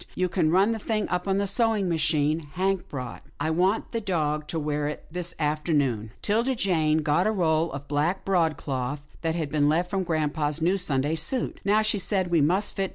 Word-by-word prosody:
You 185 0 0
can 170 -3 +1
run 190 +6 +4
the 225 - -2
thing 215 0 -1
up 180 +1 -2
on 195 0 +1
the 200 - +1
sewing 215 -1 +1
machine 155 -2 +1
Hank 190 0 -1
bought 130 -3 -6
you. - - -25
I'll 160 - 0
want 185 +6 +1
the 230 - -2
dog 155 -6 -1
to 165 - -2
wear 150 -1 -1
it 150 - -6
this 175 +1 -2
afternoon." 150 -7 0
'Tilda 235 +5 +1
Jane 160 -7 +1
got 150 +6 +2
a - - +2
roll 165 -4 +1
of 140 0 -7
black 155 +6 0
broadcloth 145 -6 -1
that 165 -1 -1
had 155 -4 -3
been 145 -1 +2
left 175 +4 +1
from 195 -1 0
grampa's 155 -3 -1
new 180 +4 +1
Sunday 145 -3 +1
suit. 165 +11 -1
160 Hz, 180 wpm, -26 LUFS, 150-190 Hz, -, run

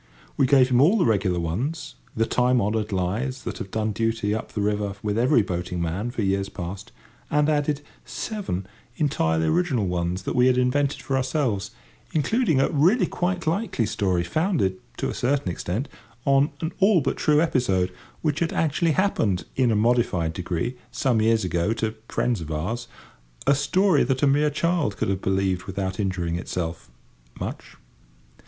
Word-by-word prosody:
We 130 - +3
gave 130 -2 +5
him 125 0 +4
all 180 +10 +5
the 185 - +3
regular 95 -5 +1
ones—the 125 - -3
time 125 +1 +2
honoured 105 0 -1
lies 105 +8 -2
that - - -5
have 95 - -6
done 110 +1 -1
duty 110 -1 0
up 110 - -4
the - - -4
river 105 -1 -1
with 105 -1 -1
every 120 +1 +4
boating 90 -1 -3
man 85 +7 -2
for 120 -3 -3
years 95 0 0
past—and 100 +10 -4
added 150 -1 +1 0.2
seven 195 - -4 0.3
entirely 80 - +1
original 125 - +1
ones 90 +1 -2
that - - -2
we 125 0 +5
had 125 -1 +3
invented 140 +3 +1
for 135 - -1
ourselves, 130 - 0 0.4
including 160 - +2
a - - +2
really 175 - +4
quite 180 -1 -2
likely 165 - 0
story, 95 -4 0
founded, 100 - 0 0.2
to - - -1
a - - -3
certain 130 -6 0
extent, 95 - -3 0.4
on 140 +1 +4
an 160 +1 -2
all 195 -3 +5
but - - -1
true 150 0 +3
episode, 95 - +1 0.3
which 150 -1 0
had 170 -1 0
actually 160 +1 +1
happened 115 - +1
in 130 -3 +3
a 110 - +2
modified 105 -7 +2
degree 90 +7 -3
some 120 -5 +1
years 110 -1 +3
ago 90 +4 0
to 110 -1 -2 0.2
friends 120 -7 0
of 80 - -7
ours—a 90 - -4
story 150 +4 +3
that 130 +2 0
a - - +7
mere 145 +2 +3
child 155 - 0
could - - -1
have 95 -1 -1
believed 95 -1 0
without 95 0 -3
injuring 90 -4 -1
itself, 85 -2 -4 0.5
much. - - -6
115 Hz, 165 wpm, -24 LUFS, 95-145 Hz, 0.5 s, a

